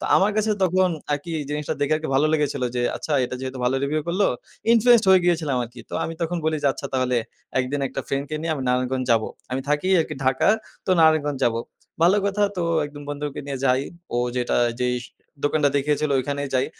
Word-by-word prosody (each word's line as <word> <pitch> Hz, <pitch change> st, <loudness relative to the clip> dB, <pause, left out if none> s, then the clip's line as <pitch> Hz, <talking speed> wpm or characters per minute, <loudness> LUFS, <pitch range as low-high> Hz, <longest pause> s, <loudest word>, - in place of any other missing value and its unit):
তো -, -, -5 dB
আমার 195 Hz, +2 st, +3 dB
কাছে 215 Hz, 0 st, +1 dB
তখন 185 Hz, 0 st, +3 dB, 0.2 s
আরকি 145 Hz, +4 st, -3 dB, 0.2 s
জিনিসটা 150 Hz, 0 st, -2 dB
দেখে 145 Hz, +1 st, +1 dB
আরকি 155 Hz, 0 st, -5 dB
ভালো 140 Hz, +3 st, +4 dB
লেগেছিল 150 Hz, -4 st, 0 dB
যে, 120 Hz, -, +1 dB
আচ্ছা, 155 Hz, -, -5 dB
এটা 125 Hz, -, -5 dB
যেহেতু 130 Hz, 0 st, -5 dB
ভালো 125 Hz, +2 st, +2 dB
রিভিউ 150 Hz, +2 st, 0 dB
করলো, 190 Hz, +4 st, +2 dB, 0.5 s
ইনফ্লুয়েন্সড 235 Hz, -1 st, +5 dB
হয়ে 190 Hz, -1 st, +7 dB
গিয়েছিলাম 160 Hz, -6 st, +1 dB
আরকি। 120 Hz, +1 st, -12 dB
তো -, -, -5 dB
আমি 165 Hz, -, -4 dB
তখন 170 Hz, +1 st, -1 dB
বলি 160 Hz, 0 st, +1 dB
যে, -, -, +2 dB
আচ্ছা, 140 Hz, -, -6 dB
তাহলে 130 Hz, -1 st, +1 dB, 0.4 s
একদিন 135 Hz, +3 st, -2 dB
একটা -, -, -4 dB
ফ্রেন্ডকে 140 Hz, +2 st, -2 dB
নিয়ে 160 Hz, 0 st, -1 dB
আমি 140 Hz, -, -4 dB
নারায়ণগঞ্জ 130 Hz, +1 st, 0 dB
যাব। 115 Hz, -1 st, +3 dB, 0.3 s
আমি 130 Hz, +1 st, -1 dB
থাকি 150 Hz, +5 st, +1 dB
আরকি 160 Hz, -, -3 dB
ঢাকা, 130 Hz, 0 st, +2 dB, 0.4 s
তো -, -, 0 dB
নারায়ণগঞ্জ 155 Hz, -3 st, +3 dB
যাবো। 115 Hz, -1 st, +1 dB, 0.4 s
ভালো 180 Hz, +4 st, +5 dB
কথা। 200 Hz, +1 st, 0 dB
তো 180 Hz, -, -1 dB, 0.2 s
একজন 145 Hz, 0 st, -9 dB
বন্ধুকে 145 Hz, -1 st, -4 dB
নিয়ে 140 Hz, -1 st, -4 dB
যাই। 130 Hz, 0 st, +3 dB, 0.3 s
ও -, -, +1 dB, 0.2 s
যেটা 125 Hz, -1 st, 0 dB, 0.3 s
যেই 125 Hz, 0 st, +1 dB
স -, -, -9 dB, 0.4 s
দোকানটা 145 Hz, 0 st, +2 dB
দেখিয়েছিল 150 Hz, +1 st, 0 dB
ওখানেই 140 Hz, +2 st, -3 dB
যাই। 130 Hz, -, +2 dB
145 Hz, 205 wpm, -23 LUFS, 130-160 Hz, 0.5 s, হয়ে